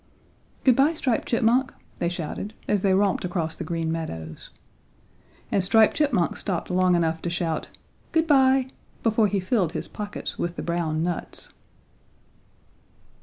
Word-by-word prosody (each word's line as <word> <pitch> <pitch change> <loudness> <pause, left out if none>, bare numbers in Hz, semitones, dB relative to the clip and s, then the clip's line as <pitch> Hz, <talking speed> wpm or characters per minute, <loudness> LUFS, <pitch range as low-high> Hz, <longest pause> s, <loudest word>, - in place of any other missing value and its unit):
"Good 255 -3 +5
bye, 280 +5 +4
Striped 260 -7 -1
Chipmunk," 240 +3 +2 0.2
they 170 - +1
shouted 175 +5 -5
as 205 -2 +1
they 190 -1 +3
romped 195 -1 +2
across 175 -3 -2
the - - -5
Green 165 0 -2
Meadows. 80 - -6 1.0
And 195 - +3
Striped 220 +3 +4
Chipmunk 280 - +1
stopped 185 -2 -3
long 180 0 +3
enough 165 -1 0
to 175 - -2
shout 170 -2 -2 0.4
"Good 320 0 +2
bye" 265 -3 +4 0.3
before 220 -1 +3
he 200 0 0
filled 185 -3 0
his - - -4
pockets 210 0 -6
with 175 0 -2
the - - -5
brown 165 -2 -1
nuts. 175 -1 -4
185 Hz, 145 wpm, -25 LUFS, 170-225 Hz, 1.0 s, Good